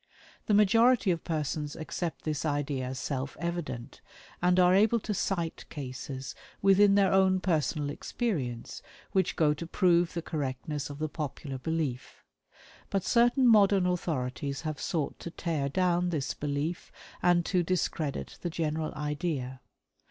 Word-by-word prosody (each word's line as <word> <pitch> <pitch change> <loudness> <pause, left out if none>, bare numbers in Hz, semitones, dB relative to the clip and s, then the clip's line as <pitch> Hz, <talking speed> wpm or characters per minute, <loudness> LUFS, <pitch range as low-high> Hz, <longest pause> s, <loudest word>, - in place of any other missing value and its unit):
The 210 - +4
majority 225 +1 +5
of 170 -2 -2
persons 150 -2 -2
accept 165 +1 -4
this 155 -2 -2
idea 145 -3 -1
as 130 0 -5
self 135 -1 -3
evident, 170 -8 -4 0.4
and 180 +1 +4
are 180 0 +6
able 220 +4 +4
to 210 - -3
cite 170 -4 -2
cases 130 -1 -6 0.3
within 195 +1 +5
their 195 -2 +4
own 190 -1 +4
personal 155 -4 0
experience 145 - -3 0.3
which 190 -2 +1
go 150 -3 +3
to 160 +3 -7
prove 175 -1 +2
the 170 - -2
correctness 145 -1 -3
of 145 - -7
the 155 +1 -1
popular 145 -3 -5
belief. 150 -4 -3 0.7
But 195 -2 0
certain 240 +2 +4
modern 200 -4 +5
authorities 140 -6 -2
have 155 -2 -4
sought 155 -5 -2
to - - -6
tear 160 -5 -2
down 180 +2 +1
this 150 -6 -2
belief, 145 +4 -3 0.3
and 175 -1 +3
to 180 -2 +2
discredit 165 -4 -2
the 175 - -2
general 160 -1 -2
idea. 145 -3 -3
165 Hz, 145 wpm, -29 LUFS, 145-185 Hz, 0.7 s, are